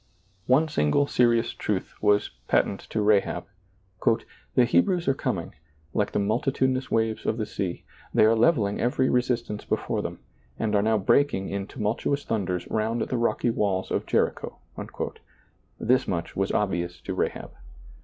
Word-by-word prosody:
One 140 +5 +4
single 140 - +2
serious 120 -3 +2
truth 100 -3 -3
was 105 -1 +3 0.2
patent 100 - +2
to 110 - 0
Rahab, 105 -1 +2 0.7
" - - -25
The 125 - +6
Hebrews 175 - +2
are 135 - +4
coming, - - -3 0.4
like 105 - 0
the - - -1
multitudinous 130 +4 0
waves 110 -1 0
of 110 - +1
the 110 - -1
sea; 95 -5 -4 0.3
they - - +5
are 110 +1 +5
leveling 110 -4 +2
every 130 +2 +2
resistance 120 -4 0
before - - -1
them, - - -5 0.4
and 110 -1 0
are 100 - +4
now 110 +1 +2
breaking 100 0 +2
in 100 0 -3
tumultuous 115 +6 -1
thunders 95 -5 -2
round 110 +2 0
the 125 - -2
rocky 120 0 +1
walls 100 -4 -1
of - - -1
Jericho - - 0 0.4
" - - -7
— - - -38
this 125 +2 +2
much 85 -2 -3
was 95 0 0
obvious 90 -4 -1
to - - -4
Rahab. - - -2
110 Hz, 160 wpm, -26 LUFS, 100-125 Hz, 0.7 s, The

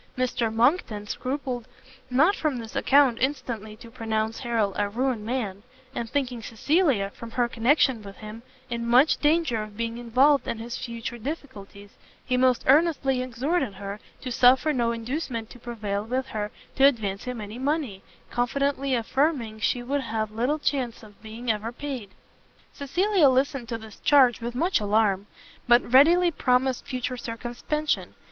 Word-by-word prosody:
Mr 245 -3 0
Monckton 225 - +1
scrupled 255 +1 -4 0.4
not 305 +11 +4
from 300 -5 -1
this 225 -2 -8
account 270 -4 +4
instantly 240 -6 -2
to 230 +1 -14
pronounce 225 -2 -2
Harrel 225 -5 0
a 205 0 0
ruined 245 0 -1
man; 215 -5 -3 0.3
and 235 -3 -4
thinking 255 -4 -2
Cecilia, 235 - +1
from 230 - -10
her 240 +1 0
connection 245 +1 +2
with 200 -1 -10
him, 215 +1 -9 0.3
in 235 -2 -3
much 250 +6 +4
danger 300 -7 +2
of 210 -1 -9
being 230 0 -3
involved 260 +5 +3
in - - -2
his 235 +2 -6
future 235 -1 -6
difficulties, 210 -7 -8 0.3
he 250 - 0
most 255 -1 +3
earnestly 275 -3 +3
exhorted 255 - -1
her 200 +1 -6 0.2
to 255 - -5
suffer 255 +5 +4
no 235 -3 +1
inducement 235 -1 -4
to 245 - -12
prevail 215 -4 -4
with 255 +4 -2
her 210 -1 -3 0.3
to 270 - +3
advance 205 -7 -1
him 250 -2 -4
any 210 +3 -7
money, 270 -8 -1 0.3
confidently 275 +2 0
affirming 240 -2 0
she 240 +3 0
would 280 +3 -1
have 220 -3 -3
little 245 +7 0
chance 255 -7 -2
of 210 -2 -16
being 225 +2 -3
ever 215 +1 -3
repaid. 245 -3 -6 0.6
Cecilia 350 +3 +2
listened 260 -2 0
to 230 - -2
this 220 -2 -13
charge 260 -6 +4
with 235 +1 -4
much 345 +8 +2
alarm, 205 -1 +1 0.4
but 240 0 +4
readily 340 +6 +6
promised 255 -3 +1
future 255 -1 -3
circumspection. 245 +6 -3
245 Hz, 155 wpm, -26 LUFS, 220-270 Hz, 0.6 s, readily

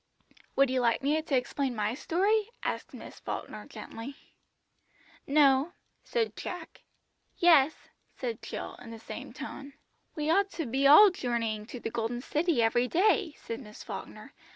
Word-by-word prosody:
"Would 275 -1 +4
you 260 - +1
like 235 +1 +2
me 300 +3 +2
to 300 -4 +1
explain 255 0 -1
my 210 0 0
story?" 405 - +1
asked - - -3
Miss - - -10
Falkner - - -6
gently. 235 +5 -8 1.1
"No," 280 +2 +4 0.3
said 455 -2 -1
Jack 360 - -4
promptly. 325 - -15 0.6
"Yes," 315 -5 +6 0.4
said 235 -4 -4
Jill, - - -6
in 240 - -10
the 230 - -8
same 225 - -8
tone. 280 0 -8 0.4
"We 300 -1 -2
ought 395 +3 +3
to 325 - -3
be 265 +3 +2
all 385 +8 +9
journeying 230 -8 -2
to 250 - -7
the 225 - -4
Golden 230 +2 -2
City 300 -2 +1
every 240 +2 +2
day," 365 - +2
said 230 - -6
Miss 210 -5 -11
Falkner. - - -8
275 Hz, 155 wpm, -29 LUFS, 235-325 Hz, 1.1 s, all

